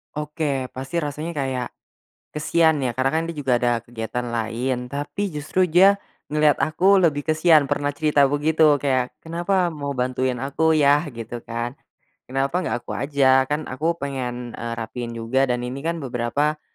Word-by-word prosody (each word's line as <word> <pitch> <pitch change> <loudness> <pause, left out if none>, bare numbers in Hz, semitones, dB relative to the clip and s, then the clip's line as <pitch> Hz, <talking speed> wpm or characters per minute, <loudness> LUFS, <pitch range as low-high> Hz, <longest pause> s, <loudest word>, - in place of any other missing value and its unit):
Oke, 150 -3 -2
pasti 135 +6 -3
rasanya 150 +2 -4
kayak 130 -5 -2 0.7
kasihan 160 0 +2
ya 125 -3 -2
karena 130 +1 +2
kan 160 - +1
dia 170 - -5
juga 135 -3 -1
ada 120 -2 +1
kegiatan 120 +1 -4
lain 120 +2 -2
tapi 145 +9 -3
justru 165 +3 0
dia, 195 +4 +5 0.3
ngeliat 150 -1 +4
aku 180 +6 +3
lebih 165 -6 +3
kasihan 155 -2 +4
pernah 145 +1 0
cerita 150 -1 +3
begitu 150 +1 +3
kayak, 130 -3 0
"Kenapa 175 +3 0
mau 145 -4 -4
bantuin 125 -1 -1
aku, 140 +4 +1
Yah?" 145 0 +4
gitu 115 0 -7
kan. 115 +3 -4 0.5
"Kenapa 135 +7 0
gak 120 -9 -3
aku - - -6
aja? 135 -2 +3
Kan 150 +1 -1
aku 160 +6 -1
pengen, 125 -4 -4
eee, 115 0 -5
rapihin 115 +1 -5
juga 130 +4 +1
dan 125 0 -1
ini 125 +3 -5
kan 165 +3 -2
beberapa 140 +2 -1
140 Hz, 160 wpm, -23 LUFS, 125-155 Hz, 0.7 s, dia